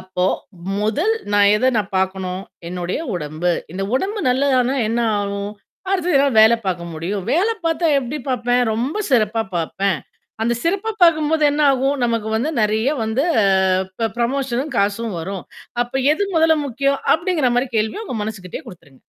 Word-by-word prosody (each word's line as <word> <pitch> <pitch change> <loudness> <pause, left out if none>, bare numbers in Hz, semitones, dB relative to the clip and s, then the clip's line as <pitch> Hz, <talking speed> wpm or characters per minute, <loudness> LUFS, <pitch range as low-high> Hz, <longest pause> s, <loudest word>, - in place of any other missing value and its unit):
அப்போ, 185 -1 -2 0.5
முதல் 260 - +1 0.2
நான் 205 0 +5
எத 255 +4 +1
நான் 205 -2 -1
பார்க்கணும், 190 0 -2 0.3
என்னுடைய 180 +3 -3 0.2
உடம்பு. 160 +2 -1 0.2
இந்த 195 - -3
உடம்பு 400 +10 -1
நல்லதானா 260 0 +2
என்ன 230 +1 0 0.2
ஆகும்? 200 0 -3 0.4
அடுத்தது 360 -5 +2
எதாவது 275 -5 +3
வேல 220 +2 +7
பார்க்க 170 -2 -2
முடியும். 185 +5 -3
வேல 375 +9 +2
பார்த்தா 330 +1 +1
எப்பிடி 270 +3 -4
பார்ப்பேன், 245 0 +1
ரொம்ப 250 - -2
சிறப்பா 225 -2 +2
பார்ப்பேன். 185 +2 -1 0.4
அந்த 235 +1 +1
சிறப்பா 395 +6 0
பார்க்கும்போது 315 -2 +4
என்ன 295 +1 -1
ஆகும்? 270 +2 +1
நமக்கு 230 -2 -1
வந்து 280 +8 0
நிறைய 215 +4 +1 0.2
வந்து 220 +5 0 0.2
அ - - +3 0.6
ப 225 - +2
புரமோஷனும் 265 +3 -1
காசும் 205 -1 0
வரும். 190 +1 -5 0.4
அப்ப 245 - -10 0.2
எது 340 +6 0
முதல 320 0 +5
முக்கியம் 275 +2 0 0.2
அப்பிடிங்கிறமாரி 280 -8 +1
கேள்விய 220 - -1
உங்க 245 - -4
மனசுகிட்டேயே 210 - -7
குடுத்துருங்க. 160 - -14
235 Hz, 150 wpm, -20 LUFS, 200-280 Hz, 0.6 s, வேல